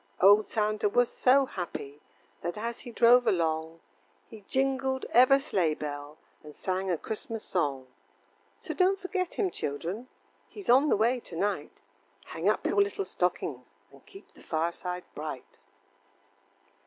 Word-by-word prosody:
Old 205 +3 +6
Santa 215 -1 0
was 245 +3 +3
so 270 +2 +4
happy, 150 - -6 0.4
That 175 +2 -4
as 230 +2 -4
he 240 - -9
drove 240 +1 +5
along 160 -1 0 0.5
He 220 -2 -11
jingled 265 0 0
ever 255 +3 +7
sleigh 190 - 0
bell, 145 0 -6 0.3
And 150 -1 -12
sang 190 0 -2
a 175 - +1
Christmas 220 +4 -6
song. 140 -7 -1 0.7
So - - -6
don't 380 +1 +3
forget 370 -1 -3
him, 385 -4 0
children, 175 - -4 0.4
He's 405 - -2
on 275 +4 +5
the - - +3
way 235 +4 +2
to 180 - -10
night, 200 +5 -3 0.4
Hang - - -1
up - - 0
your 405 - +3
little 400 0 -1
stockings, - - -3 0.2
And - - -18
keep 390 - -15
the - - -18
fireside 170 +2 -3
bright. 150 -4 -7
210 Hz, 145 wpm, -29 LUFS, 165-260 Hz, 0.7 s, ever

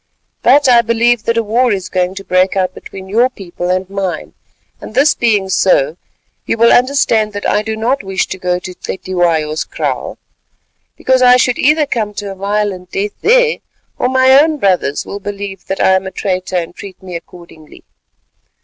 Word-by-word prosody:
But 285 0 +4
I 240 -2 +6
believe 235 0 +1
that 230 0 0
a 230 - +2
war 235 +3 +1
is 190 -3 -2
going 180 0 -1
to 195 - -7
break 185 +1 +1
out 185 -1 0
between 190 0 -10
your 235 +6 +2
people 180 -6 -6
and 185 0 -1
mine; 195 -2 -4 0.5
and 215 - -10
this 280 +3 +4
being 210 -5 +1
so, 165 -6 +2 0.5
you - - 0
will 230 +1 +5
understand 245 -5 +2
that 205 - -3
I 210 - +1
do 220 0 -4
not 245 +5 0
wish 190 -1 -1
to 190 - -6
go 180 -1 0
to 180 0 -8
Cetywayo's 170 -5 -1
kraal, - - -4 0.8
because 260 0 +1
I 250 0 +6
should 250 -1 +1
either 300 +2 +3
come 215 -6 -3
to 200 -1 -5
a - - -8
violent 200 -2 -3
death 205 +1 -2
there, 485 +1 +3 0.4
or 250 - +1
my 260 0 +4
own 310 0 0
brothers 180 - 0
will 200 - -6
believe 200 -1 -7
that 195 - -3
I - - +4
am 190 0 +1
a - - -6
traitor 185 -1 -3
and 170 -1 -4
treat 195 -2 -11
me 180 -2 -8
accordingly. 170 -2 -12
200 Hz, 185 wpm, -15 LUFS, 185-235 Hz, 0.8 s, I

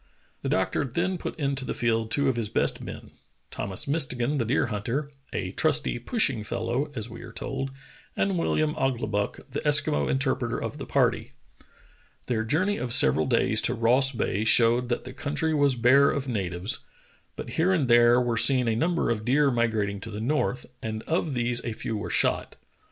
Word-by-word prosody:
The - - -3
doctor 95 +8 0
then 175 +8 -2
put - - -5
into 140 -3 -1
the - - -4
field 115 -1 0
two 140 +4 +1
of 130 - +1
his 115 -3 -2
best - - +1
men, - - -9 0.4
Thomas 100 +6 -2
Mistegan, 140 -2 0
the 115 - 0
deer 125 +6 +1
hunter, 125 +8 -3 0.2
"a 90 - -3
trusty, 155 -1 0
pushing 130 - +1
fellow," 120 +7 -2
as 110 -2 -4
we 115 - -10
are - - -10
told, 135 0 -4 0.5
and 195 - +1
WilHam 155 -4 0
Ouglibuck, 110 -6 -1
the 140 - -2
Eskimo 145 - +2
interpreter 130 -3 0
of - - -5
the - - -7
party. - - 0 0.9
Their 115 -3 -1
journey 185 - +1
of 125 - -4
several 125 +1 +3
days 115 -3 +2
to 125 - +1
Ross 125 +4 +4
Bay 110 -4 -1
showed 120 +2 +4
that 120 - -1
the - - -9
country 150 +2 -2
was 145 -3 +3
bare 130 +4 +5
of 140 -1 -2
na 100 -8 -2
tives, 90 +4 -4 0.6
but - - -7
here 175 +4 +2
and 160 -8 +1
there 120 0 +5
were 120 -2 0
seen 125 -1 +5
a 115 - +1
number 170 +6 0
of 110 -2 -2
deer 140 +4 +3
migrating 110 -4 0
to 105 - -8
the 105 -1 -6
north, 125 0 -1 0.2
and 110 -1 -4
of 160 -3 -1
these 120 0 0
a 115 - -3
few 110 - -4
were 105 - -4
shot. - - 0
125 Hz, 190 wpm, -26 LUFS, 115-140 Hz, 0.9 s, bare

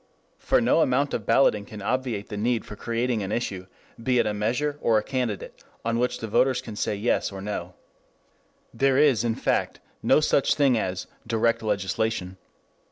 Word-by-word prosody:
For - - +2
no 125 +7 +3
amount 140 +1 +1
of 105 - -3
balloting 115 -3 +4
can 105 +1 -10
obviate 115 -1 -2
the 105 - -5
need 115 +2 0
of 105 - -9
creating 115 -1 -1
an 95 0 -4
issue, 95 -5 -3 0.3
be 125 +2 +1
it 120 - +3
a 105 - 0
measure 125 +8 -1
or 115 -1 +3
a 105 - +1
candidate, 125 -6 -4 0.2
on 115 0 0
which 125 +1 0
the 115 - -5
voters 130 +4 +2
can 115 -4 -8
say 105 - -1
Yes, 105 +1 0
or 95 - -7
No. 95 -3 -5 1.0
There 135 -1 +2
is, 140 -7 +4
in 115 -1 0
fact, - - -1 0.2
no - - +4
such 145 -2 +2
thing 140 -4 +3
as 95 -4 -2 0.2
"direct 115 0 +1
legislation." 100 -2 -1
115 Hz, 180 wpm, -25 LUFS, 105-125 Hz, 1.0 s, balloting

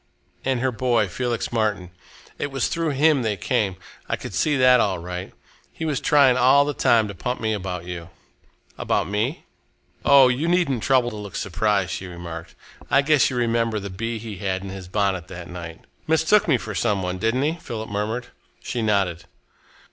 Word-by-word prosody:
"And 130 -2 0
her 130 0 +1
boy, 120 -2 +1
Felix 120 +4 -2
Martin. 105 -6 -1 0.5
It - - -1
was 135 -3 0
through 165 -1 -1
him 145 0 +3
they 110 -3 -1
came 105 -3 0 0.3
I - - +1
could - - -8
see 150 -2 +1
that 125 -1 +6
all 100 -5 +1
right. 90 +1 -6 0.4
He 165 - -5
was 150 -4 0
trying 135 -4 +5
all 130 +3 +5
the 145 - -2
time 115 -5 +3
to 100 - -6
pump 125 +7 -3
me 110 -1 0
about 90 -4 -4
you." 85 -1 -7 0.7
"About - - 0
me?" 110 - -2 0.6
"Oh! 140 -2 +7
you 125 +6 0
needn't 170 -9 +1
trouble 125 -2 +2
to - - -7
look 105 -1 -8
surprised," 100 0 0
she 95 - -5
remarked. 85 -2 -8 0.3
"I 140 +1 +4
guess 150 -1 +4
you 130 - -4
remember 115 -2 +1
the 100 -1 -7
bee 115 +5 -3
he 110 -2 -7
had 95 -1 -2
in 100 - -6
his 95 -1 -8
bonnet 95 -3 -1
that 85 -2 -8
night." 85 -2 -8 0.3
"Mistook 160 +7 +3
me 145 -6 +4
for 105 -2 -6
some 100 -2 0
one, 90 0 -3
didn't 115 +6 +1
he?" 160 +3 0
Philip 110 -2 -6
murmured. 110 +4 -3 0.3
She 120 - -3
nodded. 100 -6 0
110 Hz, 190 wpm, -23 LUFS, 95-130 Hz, 0.7 s, Oh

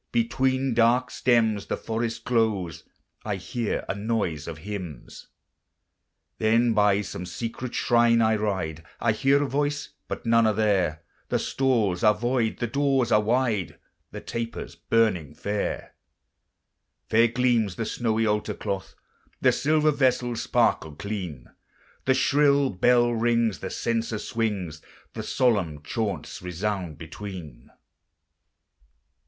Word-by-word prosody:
Between 130 +2 +1
dark 120 +2 +3
stems 110 -4 +2
the - - -2
forest 115 0 -3
glows, 110 - 0 0.4
I 105 -2 -2
hear 110 +5 -3
a - - -1
noise 100 -8 -2
of 80 -2 -6
hymns: 90 -10 -7 1.1
Then 115 +2 +3
by 105 -1 +3
some 90 -2 -6
secret 115 +5 -5
shrine 120 -1 +4
I 110 -1 +3
ride; 90 -7 -2 0.2
I 115 - +2
hear 135 +5 +3
a - - -1
voice, 145 +1 -1 0.2
but - - -5
none 115 0 +4
are 110 - +1
there; 95 -7 +1 0.3
The - - +2
stalls 115 -9 0
are 105 -1 +5
void, 120 0 0
the - - -1
doors 135 -1 +1
are 105 - +5
wide, 110 -7 0 0.3
The - - -8
tapers 115 0 -5
burning 95 -10 +1
fair. 105 0 -3 1.1
Fair 115 +2 +5
gleams 120 -5 +1
the 115 - -3
snowy 115 0 0
altar 105 0 0
cloth, 95 -2 -4 0.4
The - - +4
silver 155 +1 +2
vessels 125 -4 +1
sparkle 80 -2 +1
clean, 90 - -5 0.6
The 130 - +3
shrill 140 0 +3
bell 120 +5 +3
rings, 115 -2 +1
the 95 - -5
censer 115 0 -1
swings, 100 -9 -3 0.3
And - - -5
solemn 95 - +1
chaunts 100 -2 -3
resound 90 -2 -3
between. 80 -6 -9
110 Hz, 125 wpm, -26 LUFS, 95-120 Hz, 1.1 s, are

